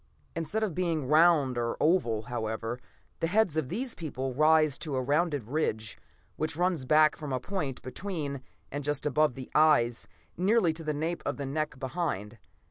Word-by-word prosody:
Instead 165 +7 -2
of 205 -6 -1
being 165 -4 -1
round 150 -4 +4
or 115 0 -2
oval, 120 -10 +2
however, 115 0 -3 0.4
the 165 - 0
heads 195 -3 +2
of 155 -5 -1
these 250 +1 -2
people 135 -5 -4
rise 155 0 +4
to 150 -4 -3
a 130 - +1
rounded 145 0 +1
ridge 115 -6 -2 0.4
which 155 0 -1
runs 175 -6 0
back 155 +2 +5
from 150 -2 -6
a 130 - 0
point 150 -5 -3
between 145 -2 -4 0.3
and 145 +1 -4
just 145 0 -1
above 150 -3 +2
the 130 -1 -9
eyes, 145 -7 +3 0.3
nearly 190 -1 +3
to 165 +1 -8
the 155 - -1
nape 165 +3 -2
of 145 - -2
the 140 - -4
neck 150 +1 -2
behind. 130 - -3
150 Hz, 175 wpm, -29 LUFS, 130-165 Hz, 0.4 s, back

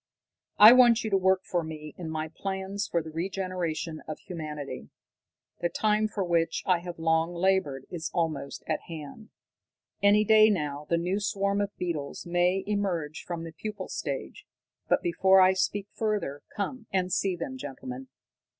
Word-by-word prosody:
"I 215 +3 +11
want 240 -2 +6
you 220 - -3
to - - +4
work 190 0 +3
for 175 -2 -1
me 155 -1 -7
in 170 -3 -6
my 155 0 -3
plans 190 +3 -4
for 170 -2 0
the 160 - -8
regeneration 175 -2 -3
of 155 -1 -5
humanity. 150 - -7 0.7
The 175 - 0
time 215 +2 +1
for 210 -2 -3
which 170 -2 0
I 180 -2 +3
have 175 0 -7
long 165 +1 +1
labored 170 -7 +1
is 165 -2 -4
almost 160 -5 -2
at 155 - -1
hand. 165 +6 -9 0.7
Any 205 +1 +5
day 215 0 +7
now 150 -6 -2
the 170 - +3
new 180 +4 0
swarm 200 0 0
of 205 0 -4
beetles 160 -6 -4
may 175 +2 +1
emerge 185 -7 -2
from 170 -2 -4
the 165 - -7
pupal 205 +3 -6
stage. 140 -4 -5 0.4
But - - +3
before 190 +3 +4
I 185 0 +6
speak 200 +2 -1
further, 210 -10 -2
come 225 +3 -4
and 185 -1 0
see 195 -2 +1
them, 260 +10 -6
gentlemen!" 260 0 -7
180 Hz, 165 wpm, -28 LUFS, 160-200 Hz, 0.7 s, I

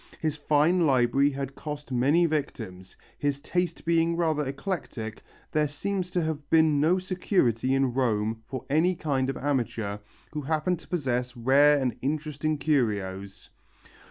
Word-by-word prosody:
His 155 -2 -1
fine 155 +4 +3
library 135 +1 +3
had 135 -1 -5
cost 145 -1 -7
many 140 +8 +3
victims, 110 - -4 0.2
his 145 -1 0
taste 180 +4 -2
being 170 0 +2
rather 160 -3 +1
eclectic, 135 - -4 0.3
there 150 -1 +2
seems 180 +6 -3
to 180 -2 0
have 155 -2 -4
been 160 -3 +4
no 165 +5 +3
security 180 - +1
in 135 -2 +1
Rome 110 -3 0
for 130 0 -6
any 160 +6 +2
kind 135 -5 -1
of 135 - -3
amateur 115 -7 -2 0.3
who 150 - -4
happened 160 +4 0
to - - -17
possess 125 -7 -2
rare 140 +5 +5
and 130 -3 -1
interesting 150 +1 -1
curios. 100 -9 -1
145 Hz, 145 wpm, -27 LUFS, 125-160 Hz, 0.3 s, rare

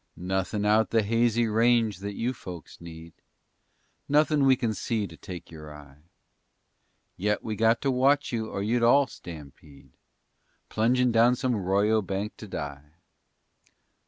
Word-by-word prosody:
_ - - -47 0.2
Nothin' 95 +3 -2
out 110 +1 +3
the 115 -1 +2
hazy 115 +2 +1
range 115 -2 +2
that 100 +1 -6
you 120 +3 -2
folks 90 - -11
need, 80 -1 -11 1.0
Nothin' 150 0 +3
we 135 -1 +5
kin 115 -3 -2
see 110 +1 -2
to - - -11
take 90 -4 -10
your 75 -1 -10
eye. 75 -1 -14 1.2
Yet 105 +2 -1
we 110 -2 -4
got 115 +2 +2
to 135 - +1
watch 140 +3 +2
you 110 -2 -3
or 100 - -4
you'd 120 +3 0
all 135 +4 +5
stampede, 75 - -13 0.8
Plungin' 125 +3 +2
down 115 +2 +4
some 130 -1 -1
'royo 100 +2 +1
bank 100 +3 -4
to 110 - -10
die. 75 -4 -7
110 Hz, 150 wpm, -26 LUFS, 90-120 Hz, 1.2 s, we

